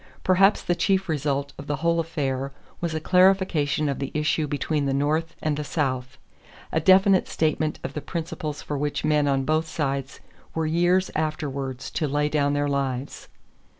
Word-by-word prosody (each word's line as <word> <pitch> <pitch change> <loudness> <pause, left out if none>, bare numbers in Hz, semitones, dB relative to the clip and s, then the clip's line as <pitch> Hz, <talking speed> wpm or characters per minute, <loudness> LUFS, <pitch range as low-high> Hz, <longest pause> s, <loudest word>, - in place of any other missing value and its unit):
Perhaps 195 +2 +4
the 175 - +1
chief 190 +2 +1
result 140 -2 -1
of 140 - -8
the 145 - 0
whole 170 +1 +1
affair 140 -5 -2 0.3
was 170 -2 -2
a - - 0
clarification 180 -4 +3
of 140 - -2
the 135 -1 -3
issue 150 0 +1
between 145 0 -1
the 135 - 0
North 155 +4 0
and 155 -1 +1
the 150 - -2
South 130 -4 -2 0.5
a 160 - +2
definite 190 +2 +5
statement 155 -1 0
of - - -4
the 150 - -4
principles 155 -3 -5
for 145 -2 -3
which 145 +1 -2
men 150 -1 +3
on 135 -1 +1
both 155 +2 +1
sides 140 -3 -3 0.4
were 160 0 0
years 175 +4 +2
afterward 140 -4 -2
to 135 +4 -3
lay 145 +1 0
down 145 -1 +1
their 145 0 +1
lives. 135 -2 -3
150 Hz, 175 wpm, -25 LUFS, 140-165 Hz, 0.5 s, definite